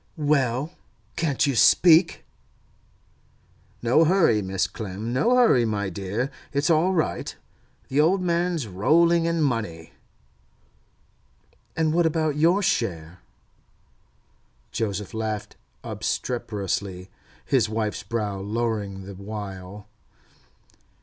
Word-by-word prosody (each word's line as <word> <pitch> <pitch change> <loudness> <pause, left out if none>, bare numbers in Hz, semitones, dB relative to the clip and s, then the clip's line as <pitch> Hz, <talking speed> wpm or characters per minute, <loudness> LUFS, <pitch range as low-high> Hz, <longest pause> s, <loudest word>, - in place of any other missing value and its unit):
'Well, 145 -1 +1 0.4
can't 150 -5 +1
you 140 -2 0
speak?' 165 +6 +5 1.6
'No 125 +7 +4
hurry, 165 - +3
Mrs. 95 0 -2
Clem; 110 +2 -5
no 230 - +3
hurry, 235 - +5
my 100 -4 -2
dear. 100 +8 -3 0.2
It's 145 +4 +1
all 165 +4 +3
right. 160 -4 -2 0.5
The 140 +3 +2
old 180 +6 +3
man's 175 -4 0
rolling 165 - +3
in 165 -1 +1
money.' 105 - -3 1.8
'And 160 -1 +1
what 170 0 +3
about 155 -2 0
your 170 +7 +3
share?' 90 - -2 1.5
Joseph 105 -3 -3
laughed 110 -2 -4 0.3
obstreperously, 100 -5 -3 0.3
his - - +2
wife's 110 -1 -2
brow 105 -2 -3
lowering 105 -2 -3
the 100 +1 -9
while. 100 0 -8
115 Hz, 100 wpm, -24 LUFS, 100-160 Hz, 1.8 s, speak